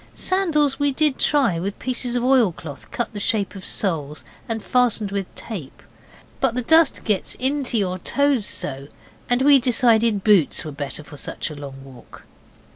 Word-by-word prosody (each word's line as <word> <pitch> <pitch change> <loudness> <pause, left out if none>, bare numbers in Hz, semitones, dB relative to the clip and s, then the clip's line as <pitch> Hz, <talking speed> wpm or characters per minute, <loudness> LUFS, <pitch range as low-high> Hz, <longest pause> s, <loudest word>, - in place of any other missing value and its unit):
Sandals 305 -8 +1
we 285 0 +2
did 295 0 +1
try, 265 - +2
with 195 +3 -4
pieces 250 -1 -3
of 245 - 0
oil 250 -6 +4
cloth 155 -3 -10
cut 240 - -3
the 205 - -5
shape 205 -1 0
of 195 -2 -10
soles 155 -8 -3 0.3
and 225 -1 -3
fastened 235 -5 +1
with 200 -2 -2
tape, 180 - -7 0.6
but 260 -3 +1
the 250 - -1
dust 320 +3 +4
gets 210 -5 -1
into 265 -2 -1
your 185 -3 -1
toes 280 +3 +1
so, 135 0 -4 0.4
and 245 +1 +2
we 285 -1 +7
decided 230 -4 +2
boots 200 -10 +3
were 155 - -5
better 145 +1 -6
for 145 0 -12
such - - -5
a - - -8
long 135 -2 -9
walk. 130 -3 -14
225 Hz, 175 wpm, -22 LUFS, 175-265 Hz, 0.6 s, we